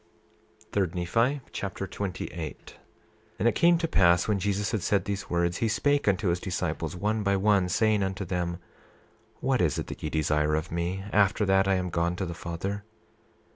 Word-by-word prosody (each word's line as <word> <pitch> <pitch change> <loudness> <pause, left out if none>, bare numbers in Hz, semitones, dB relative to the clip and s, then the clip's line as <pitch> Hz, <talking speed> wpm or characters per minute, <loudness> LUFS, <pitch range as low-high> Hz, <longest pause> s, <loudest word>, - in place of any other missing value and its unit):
3 100 -2 +2
Nephi 115 +11 +1
Chapter 100 0 -4
28 95 0 -4
28:1 80 -4 -7 0.6
And 110 - +2
it 120 - +4
came 170 +7 +4
to 165 0 -1
pass 90 - +4
when 105 -2 +1
Jesus 100 +1 -1
had 110 -4 -1
said 100 +2 +1
these 100 -1 -4
words, 85 0 +1
he 115 - +1
spake 145 +5 +1
unto 95 -1 +2
his 85 +1 +1
disciples, 85 -3 -3
one 105 +4 0
by 100 -1 +2
one, 100 -2 +3
saying 110 +2 +2
unto 95 0 -2
them: 90 -1 -2 0.8
What 130 -2 +1
is 80 -5 +1
it - - -2
that - - -8
ye 75 - -2
desire 75 0 +1
of 80 +2 -3
me, 85 +3 -2
after 105 +1 +3
that 95 0 +3
I 95 - +3
am 90 -1 -2
gone 85 +1 0
to 95 - -3
the 85 - -4
Father? 95 +5 -4
95 Hz, 190 wpm, -27 LUFS, 85-105 Hz, 0.8 s, it